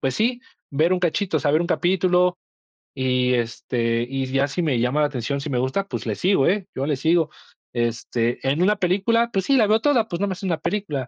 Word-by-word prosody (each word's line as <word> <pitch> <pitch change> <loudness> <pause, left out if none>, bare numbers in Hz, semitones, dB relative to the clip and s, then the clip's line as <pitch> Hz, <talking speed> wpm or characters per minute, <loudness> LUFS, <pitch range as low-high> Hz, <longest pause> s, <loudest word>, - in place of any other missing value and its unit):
pues 130 -1 -1
sí, 240 - 0 0.3
ver 155 +6 +2
un 185 - +1
cachito, 175 0 0
o - - -6
sea, 145 - +1
ver 155 - +3
un 175 - -1
capítulo, 180 0 +2 0.6
y 125 -1 +1
este, 115 0 -1
y 135 0 -2
ya 135 +2 +1
si 175 +5 -3
me 140 -7 +1
llama 125 +5 +1
la 150 - +3
atención, 140 0 -3
si 150 - -5
me 125 - 0
gusta, 135 +11 -1
pues - - -5
le - - -1
sigo, 185 -7 +2
eh, 195 +1 +1
yo 135 - -2
le 150 - +1
sigo, 160 +3 +2 0.4
este, 120 0 -1
en 145 +6 +1
una 210 +2 +3
película, 205 +6 +1
pues 190 -1 -1
sí, 275 -1 +3
la 215 -3 +4
veo 215 +1 +3
toda, 250 -7 +2
pues 170 -3 -4
nomás 190 -3 -2
es - - -12
una 175 -4 0
película, 155 -11 -3
160 Hz, 235 wpm, -22 LUFS, 130-190 Hz, 0.6 s, la